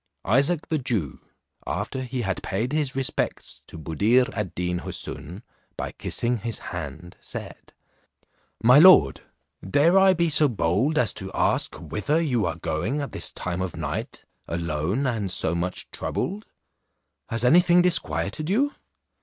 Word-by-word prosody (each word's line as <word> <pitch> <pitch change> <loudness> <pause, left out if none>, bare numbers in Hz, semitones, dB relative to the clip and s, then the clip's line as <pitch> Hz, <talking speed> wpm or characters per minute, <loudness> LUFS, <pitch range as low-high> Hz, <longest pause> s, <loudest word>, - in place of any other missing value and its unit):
Isaac 140 - +2
the 155 - 0
Jew, 110 - -2 0.5
after 130 - -3
he 125 -1 -3
had 95 -3 -2
paid 115 +8 -2
his 150 -4 -1
respects 135 -1 -2
to - - -10
Buddir 110 - +2
ad 105 -4 -4
Deen 90 0 -1
Houssun, 90 - -5 0.3
by - - -4
kissing 120 +1 -1
his 115 +1 -4 0.2
hand, 90 0 -7
said, - - -9 0.9
"My 125 +5 +7
lord, 150 - +7 0.4
dare 150 - +4
I 190 -1 +5
be 170 0 +2
so 150 0 +5
bold 120 - 0
as 115 -8 +2
to 95 0 -5
ask - - +1
whither 145 +10 -1
you 125 - +1
are 85 - -2
going 85 - -2
at 140 - -4
this - - -2
time 90 0 -4
of 95 -2 -4
night - - -5 0.2
alone, 85 - -2
and 110 -6 -1
so 80 - +2
much 90 +2 -3
troubled? 205 +3 -4 0.8
Has 115 +2 -1
any 160 +8 +7
thing 175 0 +4
disquieted 170 -2 0
you?" 275 +9 +2
120 Hz, 150 wpm, -25 LUFS, 90-150 Hz, 0.9 s, My